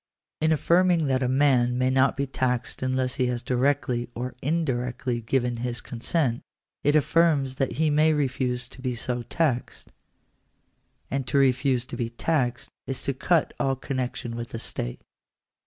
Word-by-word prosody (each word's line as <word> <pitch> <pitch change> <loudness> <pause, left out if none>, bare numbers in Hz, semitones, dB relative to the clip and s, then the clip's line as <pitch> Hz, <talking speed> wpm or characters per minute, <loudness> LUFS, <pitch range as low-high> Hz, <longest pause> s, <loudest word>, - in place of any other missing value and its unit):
In 160 0 +3
affirming 170 +1 +3
that 130 -1 +1
a 130 - +1
man 130 -3 +3
may 130 +1 +2
not 130 +1 +3
be 140 - 0
taxed 130 -2 -2
unless 130 0 0
he 125 - +2
has 125 -1 -2
directly 125 -2 0
or 125 +2 -4
indirectly 125 -5 -1
given 120 +1 0
his 120 0 -2
consent, 120 +1 -1 0.4
it 145 +1 +3
affirms 150 -4 +3
that 135 - -1
be 155 -1 +2
may 155 +2 +4
refuse 130 -4 -1
to 130 - -12
be 125 -2 -2
so 120 +1 -3
taxed; 130 0 -2 1.2
and 135 -1 -2
to - - +1
refuse 130 -2 +3
to - - -7
be 115 -2 -2
taxed, 125 0 -1 0.2
is 135 - -2
to 140 - 0
cut 165 +4 +1
all 135 0 +1
connection 125 -3 -4
with 120 0 -5
the - - -5
state. - - -5
130 Hz, 160 wpm, -26 LUFS, 125-140 Hz, 1.2 s, may